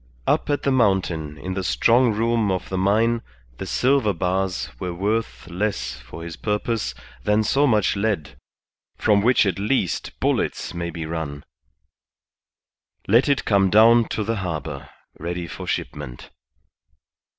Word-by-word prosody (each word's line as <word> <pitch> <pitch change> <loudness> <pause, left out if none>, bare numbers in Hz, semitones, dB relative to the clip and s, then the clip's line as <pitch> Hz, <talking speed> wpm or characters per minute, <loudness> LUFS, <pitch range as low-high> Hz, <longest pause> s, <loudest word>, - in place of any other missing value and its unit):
Up - - +1
at 145 -1 0
the 140 - +2
mountain 90 - +1
in 95 +3 -5
the 95 0 -3
strong 120 +6 +3
room 115 0 +1
of 95 -1 -2
the 95 - -2
mine 115 +4 +2 0.4
the - - -5
silver 130 -5 +2
bars 95 -3 -1
were 90 -1 -4
worth 105 +2 -2
less 90 - -2
for 60 +6 -10
his 85 -1 -6
purpose 105 - -2 0.3
than 105 +1 +2
so 140 +6 +3
much 105 -5 +2
lead, 100 -6 -1 0.6
from 105 -2 +3
which 120 +1 +4
at 95 0 -1
least 105 -2 -1
bullets - - -1
may 85 0 -3
be 80 -1 -5
run. 80 -3 -5 1.6
Let 115 +8 +4
it 140 - +1
come 100 -2 +3
down 115 +3 +6
to 110 - -2
the 115 +2 -1
harbour, 80 -6 -5 0.3
ready 85 +1 -4
for 90 +2 -8
shipment. - - -5
100 Hz, 145 wpm, -23 LUFS, 85-115 Hz, 1.6 s, down